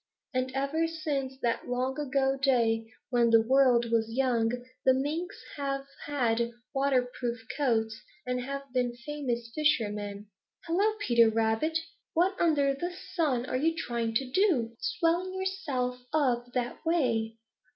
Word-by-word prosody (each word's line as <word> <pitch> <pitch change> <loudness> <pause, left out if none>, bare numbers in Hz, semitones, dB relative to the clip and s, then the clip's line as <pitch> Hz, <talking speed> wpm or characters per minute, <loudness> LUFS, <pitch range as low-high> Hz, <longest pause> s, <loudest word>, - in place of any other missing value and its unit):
And 255 0 0
ever 285 +5 +1
since 290 -5 -3
that 235 -1 0
long 255 +3 -1
ago 270 -1 +1
day 235 -5 +2 0.2
when 240 -2 +4
the 230 0 +7
world 245 -2 +4
was 225 -1 +2
young, 240 -2 +2 0.3
the 260 - +5
Minks 320 +8 -3
have 275 -1 -2 0.2
had 235 -4 +1 0.2
waterproof 250 -3 0
coats 225 -6 0 0.2
and 250 0 -1
have 275 +2 -4
been 245 -2 0
famous 240 -3 -4
fishermen. 210 -8 0 0.4
Hello, 395 +6 +2
Peter 235 - +5
Rabbit! 225 +8 +1 0.4
What 365 +4 +3
under 285 -5 +3
the 345 +6 -3 0.2
sun 280 -9 +1
are 255 - -1
you 325 +5 +1
trying 235 -6 -2
to 270 - +2
do, 255 - +2
swelling 360 +1 0
yourself 280 -10 -2
up 245 -5 +1
that 245 -1 -2
way?" 230 -9 +1
260 Hz, 135 wpm, -29 LUFS, 235-295 Hz, 0.4 s, the